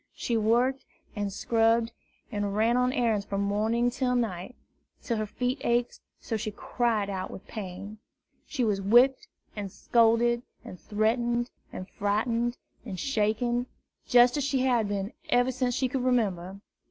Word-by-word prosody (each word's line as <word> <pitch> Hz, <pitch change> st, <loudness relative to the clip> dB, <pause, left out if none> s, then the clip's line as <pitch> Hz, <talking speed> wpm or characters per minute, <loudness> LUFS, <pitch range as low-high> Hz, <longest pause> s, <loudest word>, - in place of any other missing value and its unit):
She 235 Hz, -, -2 dB
worked 240 Hz, +5 st, +2 dB, 0.3 s
and 205 Hz, -2 st, -2 dB
scrubbed 225 Hz, +2 st, +2 dB, 0.4 s
and 205 Hz, -1 st, -2 dB
ran 225 Hz, +3 st, +3 dB
on 250 Hz, 0 st, +2 dB
errands 230 Hz, -5 st, +1 dB
from 200 Hz, 0 st, -3 dB
morning 220 Hz, +4 st, +1 dB
to 250 Hz, 0 st, 0 dB
night, 225 Hz, -1 st, -2 dB, 0.5 s
till 235 Hz, -4 st, -1 dB
her 215 Hz, 0 st, -2 dB
feet 250 Hz, +5 st, -2 dB
ached 240 Hz, 0 st, 0 dB, 0.2 s
so 225 Hz, -, -4 dB
she 215 Hz, +1 st, -3 dB
cried 220 Hz, 0 st, -1 dB
out 190 Hz, -2 st, -4 dB
with -, -, -10 dB
the -, -, -18 dB
pain. 200 Hz, 0 st, -7 dB, 0.5 s
She 270 Hz, -5 st, -2 dB
was 205 Hz, -3 st, +1 dB
whipped 240 Hz, +7 st, +4 dB, 0.3 s
and 205 Hz, -2 st, -5 dB
scolded 235 Hz, +2 st, +3 dB, 0.2 s
and 180 Hz, -, -9 dB
threatened 235 Hz, +3 st, 0 dB, 0.2 s
and 185 Hz, -, -7 dB
frightened 230 Hz, +5 st, -1 dB, 0.3 s
and 195 Hz, -6 st, -6 dB
shaken, 240 Hz, +1 st, 0 dB, 0.4 s
just 245 Hz, +1 st, +5 dB
as 290 Hz, -, 0 dB
she 270 Hz, -1 st, +1 dB
had 245 Hz, -4 st, +2 dB
been 200 Hz, +1 st, -3 dB, 0.2 s
ever 245 Hz, +1 st, +3 dB
since 250 Hz, -1 st, -1 dB
she 260 Hz, -, +1 dB
could 260 Hz, +1 st, -2 dB
remember. 200 Hz, -7 st, 0 dB
230 Hz, 155 wpm, -28 LUFS, 205-245 Hz, 0.5 s, just